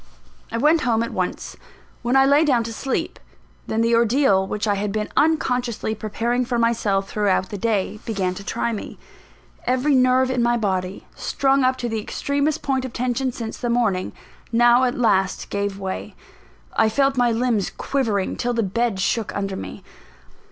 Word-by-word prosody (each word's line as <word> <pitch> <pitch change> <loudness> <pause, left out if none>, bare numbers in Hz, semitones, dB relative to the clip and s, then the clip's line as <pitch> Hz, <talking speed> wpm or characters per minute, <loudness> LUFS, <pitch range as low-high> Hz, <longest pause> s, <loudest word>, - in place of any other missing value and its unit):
I 230 - -2
went 305 +6 +3
home 230 -3 +1
at - - -5
once. - - -3 0.5
When 245 +2 0
I 270 0 +6
lay 285 +3 +5
down 255 -7 +2
to 230 0 -5
sleep 265 +4 -3 0.5
then 220 - 0
the 230 +1 +2
ordeal 230 -4 +3
which 210 +2 -2
I 205 - +3
had 200 0 -2
been 210 +1 -2
unconsciously 250 -8 +1
preparing 230 +4 -1
for 245 -1 -2
myself 215 -4 +1
throughout 200 -3 0
the 205 - -5
day, 210 -2 -1
began 195 -5 -1
to 200 - -8
try 235 +3 -2
me. 215 - -6 0.7
Every 260 +4 +2
nerve 255 0 +4
in 250 -2 0
my 240 0 +2
body, 190 -3 -2
strung 270 0 +1
up 255 0 +2
to 245 - -3
the 225 -1 -2
extremest 285 +6 -1
point 265 -2 0
of 260 -2 -6
tension 255 +1 -1
since 230 -2 -6
the 240 - -3
morning, 225 -6 +1 0.4
now 240 +2 +5
at 245 - -1
last 195 -6 +1
gave 200 -1 -2
way. 190 -1 -5 0.6
I 220 - +4
felt 275 +4 +2
my 245 -2 +3
limbs 230 -4 0
quivering, 220 -8 -1
till 245 0 -1
the 230 -1 0
bed 220 +1 -1
shook 210 +3 0
under 195 -1 -2
me. - - -8
235 Hz, 180 wpm, -22 LUFS, 205-255 Hz, 0.7 s, I